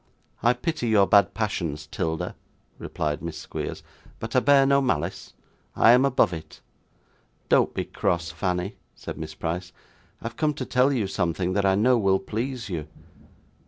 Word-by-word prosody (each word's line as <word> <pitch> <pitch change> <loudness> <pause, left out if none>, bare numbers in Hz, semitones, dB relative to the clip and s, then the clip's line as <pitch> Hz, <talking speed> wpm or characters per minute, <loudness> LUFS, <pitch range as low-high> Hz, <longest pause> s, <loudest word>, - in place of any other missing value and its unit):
'I 120 +1 +4
pity 125 0 -2
your 105 -3 +5
bad 100 +1 +4
passions, 85 -9 -2
'Tilda,' 80 +1 -3 0.5
replied 75 -1 -3
Miss 85 -2 -5
Squeers, - - -6 0.4
'but 110 +2 -6
I - - +7
bear 140 +1 +5
no 140 0 +4
malice. 95 - -2 0.4
I 115 - +6
am 125 +3 +6
above 130 -9 +3
it.' 80 -2 -9 0.9
'Don't - - +3
be - - -2
cross, 85 -1 -1
Fanny,' 90 +3 -2 0.2
said - - -7
Miss 80 -1 -6
Price. 85 +3 -4 0.5
'I - - -14
have 115 - -5
come 150 -2 +1
to 130 - -4
tell 125 +3 +3
you 120 -7 0
something 90 -1 -1
that 100 0 +2
I 95 - +4
know 120 +4 +4
will 95 -2 +3
please 120 +5 -4
you. 80 -6 -4
100 Hz, 165 wpm, -25 LUFS, 85-125 Hz, 0.9 s, I